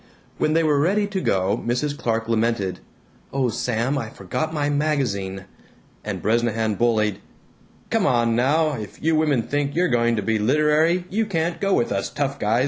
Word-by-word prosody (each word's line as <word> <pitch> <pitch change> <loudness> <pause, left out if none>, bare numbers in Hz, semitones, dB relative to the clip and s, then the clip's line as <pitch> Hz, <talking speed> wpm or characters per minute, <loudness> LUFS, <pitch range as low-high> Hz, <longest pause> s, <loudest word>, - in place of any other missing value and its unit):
When 155 - +2
they 165 +1 +3
were 150 -2 +2
ready 200 +7 +2
to 200 -2 -3
go 95 - +1
Mrs. 145 +5 -1
Clark 115 -4 -1
lamented, 115 -4 0 0.5
"Oh, 135 -2 0
Sam, 125 +5 -1
I 115 -4 -5
forgot 110 - -4
my 150 -2 -1
magazine," 125 -11 -1 0.6
and - - -5
Bresnahan 115 -1 +1
bullied, 110 -2 +1 0.7
"Come - - +2
on 115 -2 +2
now, 150 +6 +2
if 110 -6 -7
you 160 +1 +1
women 150 -6 +2
think 145 +2 -2
you're 180 +1 +2
going 120 -1 +2
to 105 - -2
be 110 +1 0
literary, 150 +8 +2
you 220 +2 0
can't 170 -3 -1
go 195 -1 +2
with 120 - 0
us 100 -1 -1
tough 140 -1 -2
guys!" 110 +3 +1
125 Hz, 175 wpm, -23 LUFS, 110-155 Hz, 0.7 s, they